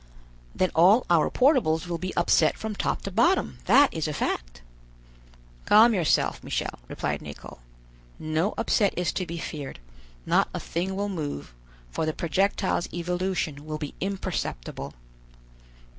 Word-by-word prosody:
"Then 185 - +1
all 190 +9 +5
our 165 -3 +4
portables 245 - +3
will 170 -1 -3
be 185 +2 -3
upset 165 -2 +3
from 220 -1 -4
top - - -2
to 195 - -4
bottom, 350 - +2
that 285 0 +5
is 160 -1 -2
a 150 - -3
fact." - - -3 1.0
"Calm 225 +3 +7
yourself, 175 -6 +1
Michel," - - -3
replied - - -3
Nicholl; - - -10 0.6
"no 155 +6 -1
upset 220 -2 +2
is 180 0 0
to 185 - -3
be 170 0 -5
feared; 150 -4 -6 0.5
not - - +2
a - - -2
thing 185 +3 -3
will 200 +1 -1
move, 150 - -5 0.4
for 155 - -2
the 155 - 0
projectile's 185 +2 0
evolution 175 -4 -2
will 155 0 -4
be 150 -2 -6
imperceptible." 190 - -4
175 Hz, 145 wpm, -26 LUFS, 155-195 Hz, 1.0 s, Calm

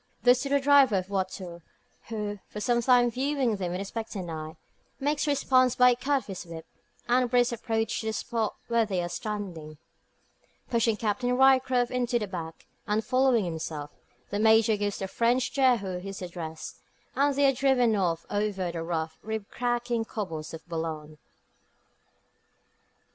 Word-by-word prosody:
This 245 0 +5
to 275 - -3
the 280 0 +3
driver 275 -5 +5
of 185 - -1
a - - -24
voiture, 185 -3 -4 0.5
who, 210 -2 -4
for 210 - -6
some 240 +2 +1
time 245 0 +4
viewing 260 -3 0
them 180 -3 -3
with 180 +2 -3
expectant 200 -3 -5
eye, 155 0 -6 0.4
makes 290 +2 0
response 255 -3 +3
by 250 -1 +6
a - - +2
cut 270 +2 0
of - - -19
his 195 -3 -6
whip, 165 -1 -9 0.4
and 245 0 +3
brisk 245 0 +3
approach 225 -1 -1
to 220 - -4
the 220 - -1
spot 225 -1 -2
where 235 -1 +3
they 190 -5 -1
are 175 - -3
standing. 175 -7 -5 0.9
Pushing 230 -2 +2
Captain 245 +4 0
Ryecroft 260 -2 +4
into 245 -1 0
the 220 - -2
back, 170 -4 -7 0.2
and 215 +1 0
following 255 -4 +3
himself, 160 -3 -5 0.4
the 205 - -1
Major 220 0 +5
gives 205 -1 -2
the 195 - -4
French 240 +5 +1
Jehu 235 -10 +2
his 195 0 -7
address, 165 -3 -7 0.3
and 280 0 +2
they 285 +1 +3
are 270 - +4
driven 250 -4 +3
off 170 -4 0
over 205 -4 -1
the 170 -1 -4
rough, 160 -1 -3
rib 220 -1 -5
cracking 240 -1 -1
cobbles 170 -9 -5
of 160 +1 -10
Boulogne. 160 -2 -5
220 Hz, 165 wpm, -28 LUFS, 180-250 Hz, 0.9 s, by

